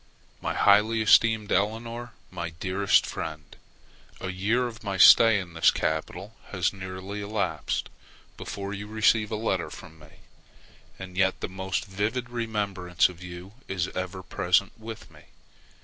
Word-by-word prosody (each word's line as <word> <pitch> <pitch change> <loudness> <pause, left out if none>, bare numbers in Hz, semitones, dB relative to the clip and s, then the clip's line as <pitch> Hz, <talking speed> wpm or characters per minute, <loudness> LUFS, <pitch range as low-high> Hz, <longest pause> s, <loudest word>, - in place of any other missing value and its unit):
MY - - -2
HIGHLY 110 +2 +4
ESTEEMED 110 0 +4
ELEONORE, 115 +4 -1 0.2
MY 85 -2 -4
DEAREST 95 +1 +2
FRIEND, 75 -2 -6 0.6
A 95 - -4
year 105 +7 0
of 115 -2 -7
my 100 -2 -3
stay 115 +4 +8
in 90 -4 -6
this 80 - +5
capital 90 +6 -2
has 90 -2 -1
nearly 95 +1 -6
elapsed 100 -7 -2 0.5
before 100 0 -6
you 100 +1 -6
receive 110 0 +2
a 110 - -2
letter 95 -7 -1
from 80 0 -12
me, 75 +1 -18 0.8
and 95 -1 -9
yet 95 0 +2
the - - -2
most 95 0 -3
vivid 110 +5 -3
remembrance 100 -7 0
of 90 -1 -12
you 90 +2 -9
is 95 -2 -2
ever 95 0 -5
present 90 +2 +1
with 110 0 -10
me. - - -17
100 Hz, 145 wpm, -26 LUFS, 90-110 Hz, 0.8 s, stay